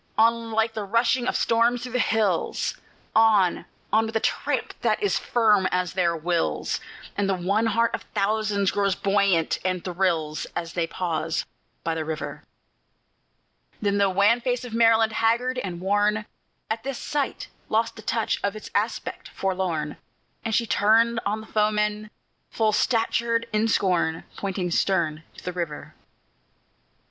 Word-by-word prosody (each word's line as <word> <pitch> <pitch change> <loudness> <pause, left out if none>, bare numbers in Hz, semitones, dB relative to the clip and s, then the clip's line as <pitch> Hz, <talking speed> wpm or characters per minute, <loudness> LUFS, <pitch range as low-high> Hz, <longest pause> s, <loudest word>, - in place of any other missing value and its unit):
on! 230 +1 +3
like 225 0 +1
the 215 - -3
rushing 235 +4 +1
of - - 0
storms 235 +1 +2
through 250 - -6
the 250 - 0
hills, 215 -7 +1 0.4
On! 215 -5 +4 0.3
on! 220 +1 +4
with 225 - -7
a - - +3
tramp - - -1
that - - +1
is 405 - +2
firm 210 -5 +3
as 180 -1 0
their 170 -3 +1
wills, 170 +1 -1 0.4
And 200 -1 0
the 195 - +2
one 200 +5 +1
heart 230 +1 +2
of - - -2
thousands 205 -1 +1
grows 200 -2 +1
buoyant, 195 -4 +2
and 185 -1 -1
thrills, 170 -4 -1
As 170 -1 -4
they 170 -2 0
pause 165 -2 -2 0.4
by 165 - 0
the 160 -1 -2
river. 155 0 -5 1.4
Then 200 -1 +1
the 200 -1 +4
wan 200 +5 +3
face 250 0 -1
of 240 - -8
Maryland, 225 -1 +4
haggard 235 +3 +1
and 180 -7 -5
worn, 205 +3 +1 0.5
At 225 0 -1
this 270 0 -4
sight 290 -2 -3 0.2
lost 225 +1 +1
the 220 - -10
touch 225 0 -1
of 200 +1 0
its 215 - -9
aspect - - -2
forlorn, 180 -6 -2 0.5
And 225 -1 -1
she 235 - +2
turned 225 +2 +3
on 215 +2 -1
the - - -11
foemen, 210 0 0 0.4
full 220 -1 +1
statured 230 +1 +1
in 215 +1 +2
scorn, 175 -6 +1
Pointing 190 -3 -3
stern 160 -4 +1 0.2
to - - -12
the 180 - -4
river. 170 -4 -5
210 Hz, 155 wpm, -25 LUFS, 180-225 Hz, 1.4 s, On